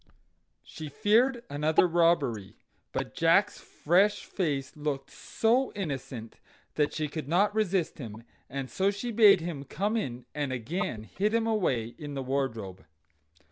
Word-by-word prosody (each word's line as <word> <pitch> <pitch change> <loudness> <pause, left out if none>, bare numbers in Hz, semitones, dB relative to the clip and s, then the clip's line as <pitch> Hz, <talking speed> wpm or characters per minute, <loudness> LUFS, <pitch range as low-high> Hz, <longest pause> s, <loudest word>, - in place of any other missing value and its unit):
She 155 -1 -8
feared 230 - +2
another 150 +4 +2
robbery; 155 - +1 0.4
but - - -3
Jack's - - +3
fresh 190 +6 +1
face 145 -8 -2
looked 145 -2 -3
so 245 +4 +1
innocent 135 - -5 0.3
that 150 -1 +1
she 155 -1 -2
could 150 -1 -6
not 195 +6 +3
resist 195 -7 0
him, 115 -3 -8 0.3
and 135 0 -4
so 190 +8 +1
she 205 +4 -3
bade 210 -5 +7
him 160 -5 -4
come 205 - -2
in, 125 - -3
and 145 -3 -2
again 125 - -3
hid 205 - -1
him 230 -1 +2
away 170 - 0
in 145 -2 -6
the 135 - -3
wardrobe. 115 - -3
155 Hz, 140 wpm, -29 LUFS, 135-200 Hz, 0.4 s, bade